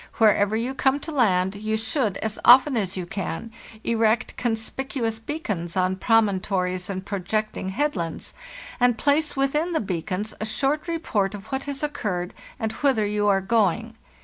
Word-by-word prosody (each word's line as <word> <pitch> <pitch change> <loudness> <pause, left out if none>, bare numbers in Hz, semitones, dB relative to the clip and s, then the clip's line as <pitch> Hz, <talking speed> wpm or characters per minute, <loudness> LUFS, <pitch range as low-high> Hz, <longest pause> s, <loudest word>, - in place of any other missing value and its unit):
Wherever 210 -1 +4
you 240 +4 -1
come 270 +1 +2
to 320 - -6
land, 190 -9 +2
you 215 +1 -1
should, 220 - 0
as 220 -1 -2
often 260 +3 +7
as 195 -4 -1
you 180 - -3
can, 195 +4 -5 0.3
erect 225 -1 +1
con 240 -2 0
spicuous 225 0 -3
beacons 205 - -3
on 185 0 +2
promontories 190 -4 +1
and 190 -1 -4
projecting 205 +1 -2
head 290 +9 0
lands, 165 -3 -4 0.5
and 245 -2 +3
place 300 +1 +2
within 295 +6 0
the 320 - +2
beacons 190 +2 -3
a - - -1
short 275 +8 0
report 220 - -1
of 200 +6 -11
what 265 0 -2
has 285 0 -4
occurred, 205 -12 -2 0.3
and 220 -1 -1
whither 255 -4 +1
you 205 0 0
are 195 -1 +3
going. 225 +2 +1
220 Hz, 165 wpm, -24 LUFS, 195-265 Hz, 0.5 s, often